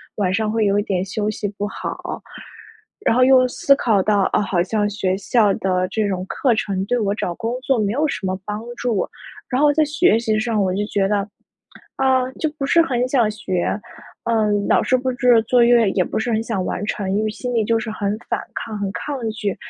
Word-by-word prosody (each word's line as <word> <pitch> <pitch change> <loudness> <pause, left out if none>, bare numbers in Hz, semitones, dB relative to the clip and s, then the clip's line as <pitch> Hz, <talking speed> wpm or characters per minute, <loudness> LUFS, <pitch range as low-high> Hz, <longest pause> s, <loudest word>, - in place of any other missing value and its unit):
晚 190 -3 0
上 215 +1 0
会 220 0 +1
有 200 0 +2
一 - - -1
点 185 -3 -1
休 205 +2 -2
息 215 -1 -3
不 205 - -2
好。 - - -6 0.8
然 - - +4
后 255 - +3
又 255 0 +6
思 275 +2 +3
考 220 -7 +2
到， 200 0 +2
啊， - - +3
好 190 -4 0
像 205 +2 0
学 190 -2 -1
校 205 0 +2
的 185 -1 0
这 215 -2 0
种 185 -2 -2
课 245 +2 +1
程 195 -3 -1
对 245 +4 0
我 200 -3 0
找 175 -5 -3
工 230 +5 -3
作 270 -1 +1
没 205 -2 0
有 300 +5 +1
什 245 - -4
么 185 0 -2
帮 210 +1 -4 0.2
助， 235 -5 -1 0.4
然 255 +1 0
后 295 -1 +5
在 310 - +3
学 300 -3 +3
习 220 -2 0
上 220 -1 0
我 185 -2 +1
就 205 +2 -1
觉 195 -2 +1
得， 200 0 0 0.7
啊， 260 -1 +2
就 315 - -2
不 275 - -2
是 335 +4 +4
很 250 -6 0
想 250 -5 +2
学， 185 -4 -2 0.6
呃， 220 -2 +2 0.2
老 - - +4
师 255 - +2
布 260 +1 -1
置 245 -2 +4
作 245 +1 +4
业 235 -3 +5
也 185 - +1
不 - - -4
是 235 +2 -1
很 220 -1 +1
想 215 -5 -2
完 195 - -3
成， 195 -3 -2
因 210 - +1
为 215 - 0
心 245 +3 -5
里 230 -2 +2
就 225 +1 +1
是 220 0 -5
很 205 -1 -2
反 - - -1
抗、 220 -2 -5
很 200 -1 -2
抗 285 +7 -4
拒， 210 -3 -3
215 Hz, 245 characters per minute, -20 LUFS, 200-245 Hz, 0.8 s, 又